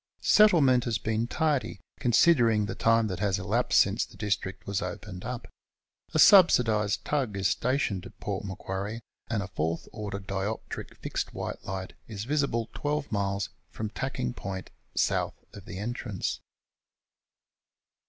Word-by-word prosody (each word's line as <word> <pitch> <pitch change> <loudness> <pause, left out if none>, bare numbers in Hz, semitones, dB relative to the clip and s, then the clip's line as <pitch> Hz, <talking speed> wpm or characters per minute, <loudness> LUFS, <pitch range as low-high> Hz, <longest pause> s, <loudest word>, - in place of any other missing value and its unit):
Settlement 145 - +6
has 115 -3 0
been 110 +2 -1
tardy, 145 - 0 0.2
considering 120 -4 +4
the - - -4
time 115 0 +3
that 95 -4 -3
has 100 -1 +1
elapsed 105 +6 +2
since 100 +4 +3
the - - -11
district 100 -2 -2
was 100 0 -1
opened 100 -3 -6
up. 125 0 -5 0.7
A - - +4
subsidised 115 - +6
tug 130 -9 -1
is 95 0 +2
stationed 125 -7 0
at - - -18
Port - - -3
Macquarie, 100 +3 -4 0.3
and 110 -4 0
a - - -6
fourth 80 -2 -2
order 105 -2 -5
dioptric 100 +2 -4
fixed - - -4
white - - -5
light 95 -1 -5
is 105 -2 -5
visible 135 -4 0
12 145 0 -2
miles 100 -1 -1 0.2
from 110 -1 -5
Tacking 65 - -3
Point, 95 -1 -6 0.2
S. - - +3
of 100 - -4
the 95 - -7
entrance. 110 -1 -3
105 Hz, 145 wpm, -28 LUFS, 100-125 Hz, 0.7 s, Settlement